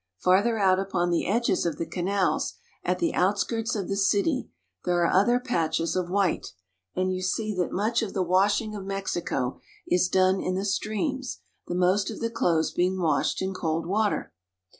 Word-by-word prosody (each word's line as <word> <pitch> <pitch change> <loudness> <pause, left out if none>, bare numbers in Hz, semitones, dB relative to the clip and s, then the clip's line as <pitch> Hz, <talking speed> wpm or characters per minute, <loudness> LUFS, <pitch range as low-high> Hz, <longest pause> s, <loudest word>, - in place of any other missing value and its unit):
Farther 200 - +3
out 190 -2 +3
upon 175 -3 0
the 170 - 0
edges 220 -1 +1
of 165 -4 -1
the 165 - -2
canals, 190 +2 0 0.3
at - - 0
the 335 -1 0
outskirts 210 +5 0
of 195 -4 -2
the 195 - -1
city, 205 +8 +1 0.3
there 175 -1 +2
are - - +2
other 240 +6 +4
patches 165 -10 -1
of 180 -1 -1
white; 190 - 0 0.4
and 185 0 0
you 185 - -3
see 215 +4 -1
that 180 - 0
much 220 +5 +1
of 220 -4 -4
the 190 - +2
washing 200 +4 +2
of 200 - -6
Mexico 190 -9 -2 0.3
is 180 0 +2
done 185 0 +3
in 185 - -1
the 195 +2 -2
streams, 240 +6 -2 0.3
the 175 - -3
most 185 +3 +2
of - - -6
the 230 0 -2
clothes 170 -8 +1
being 185 +1 0
washed 160 +1 +1
in 190 0 -2
cold 165 -2 -2
water. 205 +4 0
190 Hz, 180 wpm, -26 LUFS, 180-210 Hz, 0.4 s, other